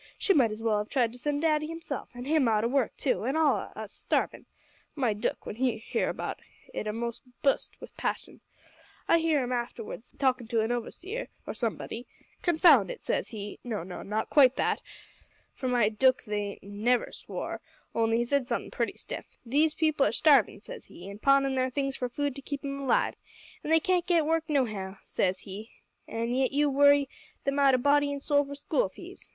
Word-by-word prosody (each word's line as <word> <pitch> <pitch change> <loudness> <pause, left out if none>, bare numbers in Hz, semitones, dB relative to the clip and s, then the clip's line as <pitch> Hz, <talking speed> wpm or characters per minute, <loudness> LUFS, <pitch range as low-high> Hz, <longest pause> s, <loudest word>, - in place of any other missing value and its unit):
she 405 - +3
might 255 -9 +4
as 215 +1 -6
well 215 -2 +2
have 210 - -4
tried 240 -4 +1
to 250 - -11
send 290 +3 -1
daddy 305 -1 +2
himself; 330 -4 -5
an' 245 +1 -7
him 300 -3 +3
out 215 -1 +2
o' - - +2
work, 260 -1 +1
too, 260 - 0
an' 265 +6 0
all 315 -2 +4
on - - -5
us - - -7
starvin'. - - -1 0.5
My 250 -7 +1
dook, 205 - -3
when 210 - -6
he 255 -1 +1
hear 220 - -1
about - - -4 0.3
it 215 - -3
a'most 230 +2 -3 0.2
bust 275 - +1
wi' - - -8
passion. - - -3 0.7
I 335 - +5
hear 320 -4 +2
'im 245 - -4
arterwards 240 -2 -4
talkin' 255 -3 +1
to 230 -1 +1
a 225 +2 0
overseer, 380 - -5 0.2
or - - -4
somebody, 235 +1 -4 0.3
"confound 350 0 +5
it," - - -6
says - - -1
he 210 -2 -7
no, 220 -7 -3
not 210 +4 -4
quite 265 -3 +6
that, - - 0 0.7
for 260 - -4
my 245 -4 +3
dook 255 +4 +3
he 205 -2 -3
never 210 +5 0
swore, - - -6 0.3
only 225 0 +2
he 240 - +2
said 265 +1 0
somethin' - - -2
pretty - - -1
stiff - - -8
"these 295 +6 +2
people 310 -3 +2
are - - 0
starvin'," 280 -9 +4
says - - -9
he, 175 - -11
"an' 200 - -10
pawnin' 275 +1 +4
their 260 0 +1
things 275 +1 -1
for 250 - -3
food 285 +1 -2
to 275 - -7
keep 280 +1 -5
'em 275 0 -3
alive, 275 -2 +2 0.5
an' - - -5
they 325 0 +6
can't 355 +1 +1
git 340 -4 +3
work 325 +1 +1
nohow," 215 -9 -1
says 185 0 0
he, 205 +4 -8 0.4
"an' 230 +1 -2
yet 260 0 +2
you 290 +1 +2
worry 285 0 +5 0.4
them 275 +1 0
out 275 -2 +6
o' - - +3
body 285 +2 +3
an' 285 - -3
soul 285 +1 +2
for 285 0 -7
school 395 - 0
fees!" - - -12
260 Hz, 200 wpm, -29 LUFS, 225-290 Hz, 0.7 s, quite